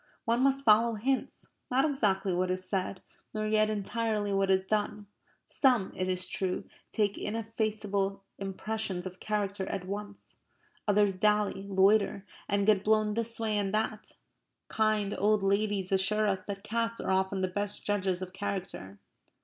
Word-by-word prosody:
One 235 +2 +2
must 275 0 +3
follow 225 +2 +5
hints, 260 +5 -2 0.2
not 265 +3 +3
exactly 200 -10 +1
what 180 +1 0
is 185 0 -1
said, 190 -1 -2 0.3
nor 215 0 -1
yet 215 0 +3
entirely 215 0 -1
what 195 0 +1
is 190 0 +3
done. 210 0 -1 0.4
Some, 245 -8 +2
it 185 0 -1
is 185 0 0
true, 185 -1 -2 0.3
take 205 -2 0
ineffaceable 210 -3 -2 0.2
impressions 195 -1 -3
of 185 0 -7
character 200 -2 -2
at 180 - -4
once. 205 +1 -7 0.5
Others 205 -1 +4
dally, 205 0 +1
loiter, 200 +1 +3 0.2
and 200 0 +2
get 205 -2 +4
blown 215 0 +3
this 230 +1 -1
way 220 -2 0
and 200 -2 0
that. 215 0 -2 0.5
Kind 215 -2 +1
old 210 0 +3
ladies 200 -1 +1
assure 205 +3 +2
us 190 -2 +1
that 200 -1 -6
cats 230 +1 -1
are - - -1
often 190 0 +1
the 185 - +1
best 205 +2 -3
judges 190 -3 0
of 185 0 -8
character. 190 - -5
205 Hz, 155 wpm, -30 LUFS, 190-215 Hz, 0.5 s, follow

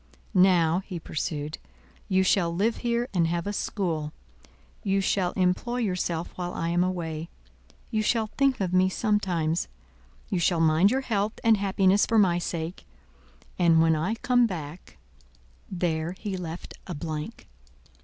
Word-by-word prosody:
Now," 180 -3 +4
he 185 - -5
pursued, 150 -1 -4 0.5
"you 190 -1 +3
shall 185 -2 +2
live 205 +7 0
here 240 0 -1
and 170 -3 +2
have 170 0 -2
a 205 - -2
school; 165 -8 -2 0.7
you 195 0 +1
shall 185 -1 +1
employ 185 +7 0
yourself 180 -6 -2
while 180 -1 -4
I 165 - -2
am 175 +1 +2
away; 165 -3 -3 0.6
you 215 -2 +1
shall 220 +1 +1
think 275 -2 +2
of 185 -2 -1
me 185 0 +4
sometimes; 180 -6 0 0.6
you 185 - -1
shall 170 0 +2
mind 165 +4 +4
your 265 +4 +1
health 215 -4 -1
and 225 -1 +6
happiness 195 0 +2
for 225 - +2
my 180 -5 +4
sake, 170 0 -5 0.7
and 165 -2 +5
when 160 0 +4
I 175 +9 -1
come 245 +1 +3
back—" 170 -3 -8 0.7
There 170 -2 -1
he 195 +1 -5
left 175 -2 -6
a 175 - -4
blank. 150 +1 -6
180 Hz, 150 wpm, -26 LUFS, 165-205 Hz, 0.7 s, and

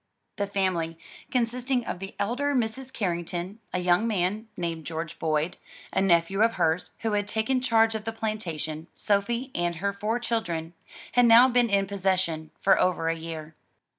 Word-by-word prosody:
The 200 - -1
family, 180 -5 -1 0.3
consisting 250 +1 0
of - - -4
the 195 +1 -7
elder 270 +7 0
Mrs. 255 +2 -1
Carrington, 180 -1 -3
a - - -1
young 180 +4 +3
man, 210 +1 0
named 165 -2 -3
George 165 +1 -5
Boyd, 155 +1 0 0.4
a - - +2
nephew 190 +1 +3
of 230 +1 +4
hers 170 -1 +1
who 225 - 0
had 205 -1 0
taken 225 +5 0
charge 225 -3 +3
of 220 -1 -4
the 225 - -1
plantation, 170 -8 -4
Sophie 235 +6 0
and 175 0 0
her 200 +4 -1
four 210 +3 -1
children, 180 -9 -2 0.4
had 245 -1 +5
now 235 +2 +9
been 245 -1 +3
in 200 -1 +3
possession 185 -5 -1
for 195 - +4
over 170 -3 +1
a 165 - +1
year. 160 -1 -7
200 Hz, 165 wpm, -27 LUFS, 170-225 Hz, 0.4 s, now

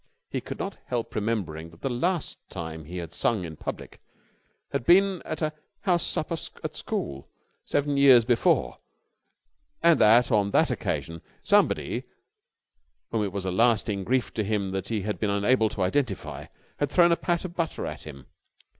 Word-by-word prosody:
He - - -2
could - - -7
not - - -5
help 120 -2 -3
remembering 95 -8 -2
that 80 0 -19
the - - -1
last 170 +8 -1
time 80 -3 -6
he 90 +4 -7
had 85 -2 -6
sung 105 -3 0
in 80 -1 -7
public - - -7 0.7
had - - -1
been 190 +3 +4
at 155 0 -4
a 155 0 0 0.3
house 175 -3 +2
supper 160 +2 -1 0.3
at - - -4
school, 70 -1 -4 0.4
seven 145 0 0
years 130 -4 +7
before, 125 +8 +2 1.0
and 170 -1 +6
that 120 +4 +6
on 105 -3 +3
that - - +3
occasion 85 0 -3 0.2
somebody - - +2 1.1
whom 110 -2 +1
it 100 - -2
was 100 -1 -4
a 95 - -1
lasting 105 -1 +2
grief 130 +4 0
to 110 - -1
him 100 -2 -1
that 95 0 -3
he 110 -3 -1
had 105 +2 -3
been 105 - 0
unable 110 +3 +3
to 100 - -2
identify 100 0 -2 0.3
had 145 - +1
thrown 170 +3 +5
a - - +5
pat 175 +1 -1
of 175 - -6
butter 165 -3 -2
at - - -6
him. 70 -4 -10
110 Hz, 170 wpm, -26 LUFS, 95-145 Hz, 1.1 s, years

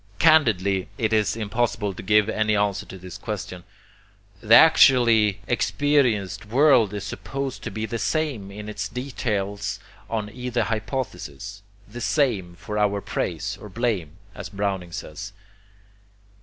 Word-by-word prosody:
Candidly, 100 - +3
it 110 -4 0
is 105 -1 +2
impossible 110 -2 -1
to - - -8
give 105 +2 +3
any 110 -1 +1
answer 100 -1 0
to 95 - -9
this 90 +1 -10
question. 95 -4 -6 0.8
The 115 +1 +6
actually 115 -10 +6
experienced 120 -7 +1
world 125 -3 +4
is 100 - -4
supposed 135 +5 -5
to - - -5
be 110 0 -4
the 115 +1 -4
same 140 -12 -1
in 105 +1 -8
its 105 0 -4
details 105 -6 -3 0.3
on 110 -2 -3
either 125 -1 -1
hypothesis, 105 - -4 0.3
"the 120 +4 -8
same, 110 - 0
for 105 +4 -4
our 100 -1 +2
praise - - -3
or 105 - -9
blame," 100 -8 -2 0.2
as 100 0 -7
Browning 100 -3 -3
says. 95 +5 -7
105 Hz, 135 wpm, -24 LUFS, 100-120 Hz, 0.8 s, The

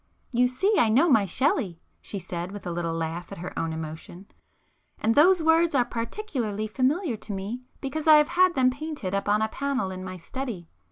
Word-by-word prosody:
"You 250 0 +3
see 365 - +1
I 225 - +4
know 265 +10 +4
my 220 - +4
Shelley!" 200 - 0 0.2
she 205 - -6
said 175 -1 -5
with 205 0 -9
a 175 - -3
little 170 -1 -2
laugh 165 +2 -4
at - - -7
her 180 +2 -6
own 165 0 -1
emotion—"And 165 +7 -6
those 335 +5 +5
words 325 0 +4
are 250 -2 +4
particularly 230 - -3
familiar 260 - 0
to 210 - -7
me, 200 +6 -4 0.2
because 295 +3 -4
I 310 - +9
have 300 +1 +5
had 360 +1 +3
them 255 -1 +4
painted 285 -8 -5
up 200 +1 -1
on 210 +1 +3
a - - +1
panel 265 -5 -2
in 185 0 -6
my 185 0 -6
study. 205 -2 -6
230 Hz, 200 wpm, -26 LUFS, 185-285 Hz, 0.2 s, I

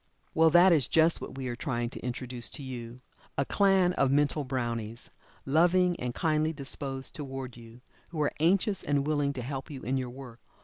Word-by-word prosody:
Well, 160 0 +5
that 175 +3 +6
is 145 -6 +3
just 165 +1 +3
what - - -7
we 130 -1 -4
are 120 - -3
trying 120 -2 -2
to - - -7
introduce 125 -1 -3
to 145 - -4
you. 125 -1 -7 0.4
A 140 - +1
clan 190 -1 +3
of 135 - +2
mental 145 +1 +2
brownies, 120 -3 -4 0.3
loving 175 +5 +3
and 125 -1 -4
kindly 155 -1 +1
disposed 135 -2 -2
toward 135 -4 -6
you, 115 0 -14 0.3
who 165 - -7
are 145 - 0
anxious 190 +4 +2
and 145 -1 0
willing 145 -2 +1
to 130 -3 -5
help 135 +1 -5
you 140 -4 -8
in 135 +2 -1
your 130 -1 -3
work. 125 -2 -11
135 Hz, 190 wpm, -29 LUFS, 125-160 Hz, 0.4 s, that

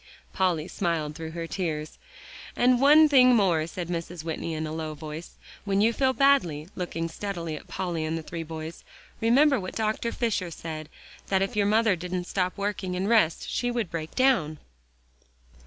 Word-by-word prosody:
Polly 180 -4 +1
smiled 165 -6 -2
through 160 +1 -6
her 170 0 -4
tears. 160 -4 -4 0.6
"And 250 0 +3
one 305 +3 +7
thing 255 -4 +6
more," 175 -7 +2
said 175 0 -5
Mrs. 170 -1 -5
Whitney 165 0 -3
in 155 0 -3
a 155 - -5
low 155 -1 -4
voice, 155 +2 -8 0.3
"when 195 -1 0
you 225 +3 +4
feel 260 +2 +2
badly," 260 - +2
looking 165 -2 -3
steadily 170 -2 -4
at - - -10
Polly 175 -4 -3
and 160 +1 -2
the 160 - -6
three 165 +1 -6
boys, 160 0 -7 0.4
"remember 270 +4 +4
what 185 -1 -6
Dr. 220 +1 -1
Fisher 220 -8 -1
said; 155 -2 -7 0.4
that 190 -1 +2
if 195 +4 -3
your 205 -1 +2
mother 215 -1 +3
didn't 180 +1 -4
stop 180 +1 -2
working, 200 -2 -2
and 185 +2 -1
rest, 215 -9 +3
she 245 - -1
would 235 -6 -2
break 160 -1 -5
down." 235 - +2
180 Hz, 175 wpm, -27 LUFS, 160-220 Hz, 0.6 s, one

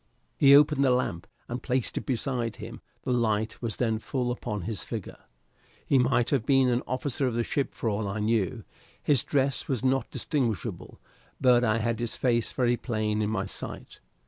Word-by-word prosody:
He 140 0 +7
opened 145 -1 +5
the 135 - +4
lamp 125 -9 0 0.2
and 120 +2 -4
placed 125 -2 -1
it - - -4
beside 125 -2 -1
him; - - -9 0.2
the - - -2
light 110 -2 0
was 115 -3 -3
then 110 -3 0
full 125 +1 -2
upon 105 -4 -4
his 105 +2 -3
figure. - - -6 0.7
He 135 - +3
might 125 -1 +2
have 135 -6 +2
been 135 0 +4
an 120 0 +1
officer 135 +1 -1
of 120 - -2
the 120 - +1
ship 140 +3 -2
for - - -3
all 105 -1 -1
I 100 +2 -3
knew. 110 +1 0 0.4
His 140 -5 +3
dress 135 -2 0
was 130 -3 -1
not 135 +1 +1
distinguishable, 120 -8 -3 0.4
but 125 -2 +5
I 110 -2 +2
had 115 +1 -1
his 120 -2 -3
face 120 -3 +1
very 120 -2 +1
plain 110 -3 -1
in 105 - 0
my 95 -3 -1
sight. - - -7
120 Hz, 190 wpm, -27 LUFS, 110-130 Hz, 0.7 s, He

